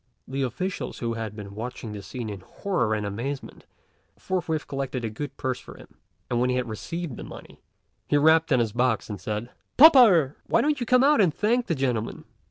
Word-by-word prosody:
The 135 Hz, +1 st, -3 dB
officials 180 Hz, -, -3 dB
who 115 Hz, -1 st, -2 dB
had 110 Hz, -2 st, -5 dB
been 100 Hz, -2 st, -8 dB
watching 115 Hz, +1 st, -6 dB
the 105 Hz, -1 st, -6 dB
scene 120 Hz, +3 st, -6 dB
in 100 Hz, -2 st, -6 dB
horror 110 Hz, -, -1 dB
and 105 Hz, -1 st, -3 dB
amazement, 125 Hz, +7 st, -5 dB, 0.5 s
forthwith 170 Hz, -4 st, -2 dB
collected 135 Hz, -3 st, -3 dB
a 110 Hz, -, -3 dB
good 145 Hz, +7 st, -6 dB
purse 130 Hz, -1 st, -2 dB
for -, -, -12 dB
him; -, -, -16 dB, 0.3 s
and 120 Hz, -, 0 dB
when 125 Hz, -, +2 dB
he 125 Hz, -, +1 dB
had 125 Hz, -1 st, -1 dB
received 155 Hz, +6 st, -5 dB
the -, -, -7 dB
money, -, -, -12 dB, 0.5 s
he 145 Hz, -, +3 dB
rapped 160 Hz, +2 st, +4 dB
on 130 Hz, -, +5 dB
his 115 Hz, -4 st, 0 dB
box 120 Hz, -2 st, 0 dB
and 100 Hz, -3 st, -6 dB
said, 110 Hz, +4 st, -4 dB, 0.3 s
"Pa 315 Hz, +5 st, +11 dB
pa'rh! 180 Hz, -, +5 dB
why -, -, +3 dB
don't 295 Hz, -1 st, +1 dB
you 240 Hz, -, -3 dB
come 250 Hz, +2 st, +5 dB
out 290 Hz, -4 st, +5 dB
and 180 Hz, -5 st, +4 dB
thank 235 Hz, +8 st, 0 dB
the 165 Hz, -, 0 dB
gentlemen?" 125 Hz, -5 st, -2 dB
130 Hz, 210 wpm, -25 LUFS, 115-170 Hz, 0.5 s, Pa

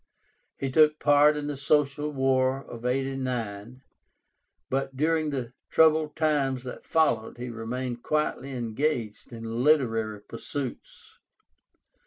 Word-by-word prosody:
He 135 Hz, -1 st, -3 dB
took 150 Hz, +2 st, +5 dB
part 145 Hz, +1 st, +5 dB
in 145 Hz, -, -3 dB
the 145 Hz, 0 st, -3 dB
Social 145 Hz, +1 st, +1 dB
War 135 Hz, -1 st, +1 dB, 0.2 s
(89), 125 Hz, -3 st, -3 dB, 0.8 s
but 135 Hz, 0 st, -2 dB
during 155 Hz, +1 st, +1 dB
the 125 Hz, -4 st, -4 dB, 0.2 s
troubled 155 Hz, -1 st, +4 dB
times 140 Hz, -5 st, +1 dB
that 125 Hz, -, -8 dB
followed 120 Hz, -10 st, +1 dB
he 125 Hz, +1 st, -5 dB
remained 120 Hz, +2 st, -4 dB
quietly 150 Hz, -2 st, -1 dB
engaged 120 Hz, -2 st, -2 dB
in 115 Hz, +1 st, -4 dB
literary 115 Hz, -8 st, +2 dB
pursuits. 130 Hz, +3 st, -7 dB
135 Hz, 110 wpm, -27 LUFS, 120-150 Hz, 0.8 s, took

